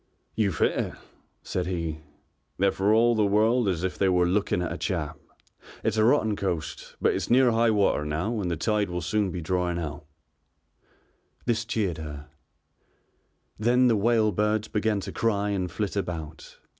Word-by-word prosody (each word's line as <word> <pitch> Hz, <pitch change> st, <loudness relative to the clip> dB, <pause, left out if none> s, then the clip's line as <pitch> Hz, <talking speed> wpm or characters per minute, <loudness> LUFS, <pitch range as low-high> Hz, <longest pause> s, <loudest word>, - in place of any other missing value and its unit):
"You've 100 Hz, -6 st, 0 dB
hit -, -, +3 dB
it," -, -, -3 dB, 0.5 s
said 90 Hz, -1 st, -2 dB
he, 85 Hz, -4 st, -3 dB, 0.6 s
"they're 100 Hz, +1 st, +3 dB
for 100 Hz, +2 st, +1 dB
all 115 Hz, +2 st, +5 dB
the 110 Hz, -2 st, +2 dB
world 110 Hz, +3 st, +3 dB
as 90 Hz, -3 st, -1 dB
if 95 Hz, -, -3 dB
they 95 Hz, -, +3 dB
were 90 Hz, -1 st, +3 dB
looking 90 Hz, -1 st, +1 dB
at 85 Hz, -, -3 dB
a -, -, -5 dB
chap. 85 Hz, -6 st, -3 dB, 0.6 s
It's -, -, 0 dB
a 110 Hz, -, +4 dB
rotten 110 Hz, -3 st, +3 dB
coast, 90 Hz, -6 st, -4 dB
but -, -, +2 dB
it's -, -, -3 dB
near 125 Hz, 0 st, +5 dB
high 115 Hz, +1 st, +3 dB
water 100 Hz, -8 st, +2 dB
now 90 Hz, +10 st, -2 dB
and 90 Hz, -, -2 dB
the 85 Hz, -, -2 dB
tide 105 Hz, +2 st, 0 dB
will 90 Hz, 0 st, -3 dB
soon 105 Hz, +4 st, 0 dB
be 90 Hz, 0 st, -5 dB
drawing 90 Hz, +1 st, -1 dB
out." 75 Hz, -4 st, -5 dB, 1.4 s
This 115 Hz, -2 st, 0 dB
cheered 105 Hz, -, -1 dB
her. 75 Hz, -1 st, -8 dB, 1.3 s
Then 125 Hz, +3 st, +4 dB
the 115 Hz, -, +3 dB
whale 110 Hz, 0 st, +3 dB
birds 105 Hz, +2 st, 0 dB
began 105 Hz, -1 st, 0 dB
to -, -, -6 dB
cry 105 Hz, -3 st, 0 dB
and 95 Hz, -3 st, -1 dB
flit 105 Hz, +1 st, -3 dB
about. 80 Hz, -5 st, -5 dB
100 Hz, 175 wpm, -26 LUFS, 90-110 Hz, 1.4 s, all